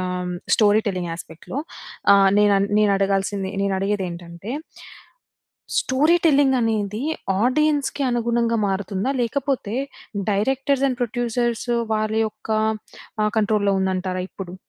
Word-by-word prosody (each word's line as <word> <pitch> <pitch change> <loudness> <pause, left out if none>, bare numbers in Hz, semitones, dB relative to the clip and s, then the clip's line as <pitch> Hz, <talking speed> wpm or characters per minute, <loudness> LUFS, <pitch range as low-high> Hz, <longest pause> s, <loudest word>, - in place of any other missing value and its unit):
ఆహ్, 180 -1 -3 0.2
story 215 0 +4
telling 180 -3 -3
యాస్పెక్ట్‌లో 165 - -7 0.6
ఆహ్, 195 -1 +6
నేనన్ 200 -1 +4
నేనడగాల్సింది, 195 -1 +1
నేనడిగేదేంటంటే... 190 -1 -3 1.3
story 295 +6 +3
telling 280 -4 +4
అనేది 215 -2 -1 0.4
ఆడియన్స్‌కి 290 +2 +1
అనుగుణంగా 235 -1 +1
మారుతుందా? 195 +4 -1
లేకపోతే 255 -3 -1 0.6
డైరెక్టర్స్ 270 +6 +1
అండ్ 255 -1 -3
ప్రొడ్యూసర్సు 240 0 -1 0.2
వాళ్ళ 215 0 -1
యొక్క 215 - -11 0.8
ఆహ్, 210 - 0
కంట్రోల్‌లో 205 -2 +2
ఉందంటారా 185 -1 -1
ఇప్పుడు? 185 -2 -8
210 Hz, 100 wpm, -22 LUFS, 195-245 Hz, 1.3 s, ఆహ్